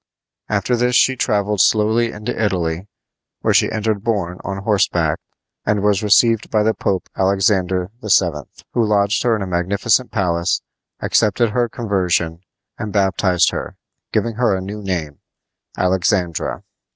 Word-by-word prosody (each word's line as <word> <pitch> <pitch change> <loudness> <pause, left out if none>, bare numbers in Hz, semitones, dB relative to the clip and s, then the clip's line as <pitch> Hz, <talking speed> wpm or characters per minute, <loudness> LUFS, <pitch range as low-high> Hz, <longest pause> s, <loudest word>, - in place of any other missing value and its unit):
After 105 +4 +1
this 125 +1 +1
she 130 - +4
traveled 105 -4 0
slowly 110 +2 +3
into 105 +4 -5
Italy, 90 -3 -1 0.5
where - - +2
she - - +3
entered 110 -2 -1
Borne 100 -6 -2
on 100 0 -5
horseback, 90 -6 +1 0.4
and 105 -2 0
was 105 -2 +2
received 115 +1 +3
by 105 -1 +2
the 110 +1 +2
Pope, 95 -4 -2
Alexander 95 -1 +1
VII., 85 -8 +1 0.2
who 120 - +2
lodged 105 -1 +2
her 120 -2 +2
in 105 - -3
a - - -3
magnificent 100 +7 +1
palace, 85 -4 0 0.4
accepted 110 +2 +2
her 120 +1 0
conversion, 90 -7 -1 0.4
and 110 -3 -4
baptized 95 -3 +2
her, - - -5 0.4
giving 115 -2 -1
her 115 -5 +2
a - - -2
new 105 +3 -6
name, 85 -7 -4 0.6
Alexandra. 90 -2 0
100 Hz, 140 wpm, -19 LUFS, 90-110 Hz, 0.6 s, she